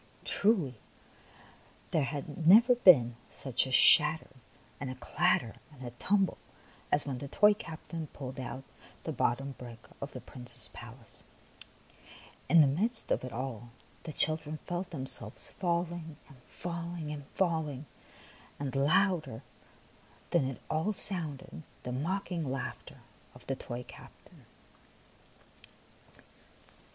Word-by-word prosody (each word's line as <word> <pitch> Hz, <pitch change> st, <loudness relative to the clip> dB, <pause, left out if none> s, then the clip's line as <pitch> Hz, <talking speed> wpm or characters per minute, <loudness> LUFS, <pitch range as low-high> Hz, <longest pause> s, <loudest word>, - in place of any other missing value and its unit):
Truly, 175 Hz, -, +2 dB, 1.1 s
there 155 Hz, -4 st, +2 dB
had 145 Hz, +2 st, -4 dB
never 230 Hz, +7 st, +8 dB
been 135 Hz, -, +6 dB
such 135 Hz, -1 st, 0 dB
a -, -, -6 dB
shatter 150 Hz, +4 st, +7 dB, 0.5 s
and 135 Hz, -, -4 dB
a 130 Hz, -, -5 dB
clatter 130 Hz, -, 0 dB
and 130 Hz, -4 st, -11 dB
a 120 Hz, -, -6 dB
tumble 195 Hz, +10 st, 0 dB, 0.5 s
as 145 Hz, -, +2 dB
when 135 Hz, -3 st, -4 dB
the 140 Hz, -, -6 dB
toy 210 Hz, +8 st, +5 dB
captain 165 Hz, -3 st, -7 dB
pulled 130 Hz, -2 st, -8 dB
out 130 Hz, +1 st, -6 dB, 0.4 s
the -, -, -3 dB
bottom 135 Hz, +3 st, 0 dB
brick 120 Hz, -2 st, -9 dB, 0.2 s
of 140 Hz, -, -6 dB
the -, -, -6 dB
Prince's 125 Hz, -3 st, +1 dB
palace! -, -, -13 dB, 1.3 s
And 165 Hz, -2 st, +7 dB
in 135 Hz, -1 st, +2 dB
the 175 Hz, -, -2 dB
midst 230 Hz, +1 st, -2 dB
of -, -, +1 dB
it 130 Hz, -, -6 dB
all 120 Hz, -1 st, -5 dB, 0.3 s
the 160 Hz, -, -7 dB
children 155 Hz, 0 st, -1 dB
felt 175 Hz, +1 st, -4 dB
themselves 130 Hz, -7 st, 0 dB
falling 170 Hz, -3 st, -2 dB
and 140 Hz, -, -16 dB
falling 170 Hz, -2 st, -5 dB
and 145 Hz, -2 st, -7 dB
falling. 160 Hz, -6 st, -1 dB, 0.7 s
And 140 Hz, -1 st, -4 dB
louder 155 Hz, -, +1 dB, 0.9 s
than 170 Hz, -6 st, +3 dB
it 130 Hz, -1 st, -5 dB
all 160 Hz, +7 st, 0 dB
sounded 165 Hz, -9 st, -2 dB, 0.2 s
the 125 Hz, -, -5 dB
mocking 165 Hz, +1 st, -2 dB
laughter 135 Hz, -, -6 dB, 0.3 s
of -, -, -15 dB
the 135 Hz, -, -2 dB
toy 125 Hz, -1 st, -7 dB
captain. -, -, -16 dB
150 Hz, 125 wpm, -31 LUFS, 130-175 Hz, 1.3 s, never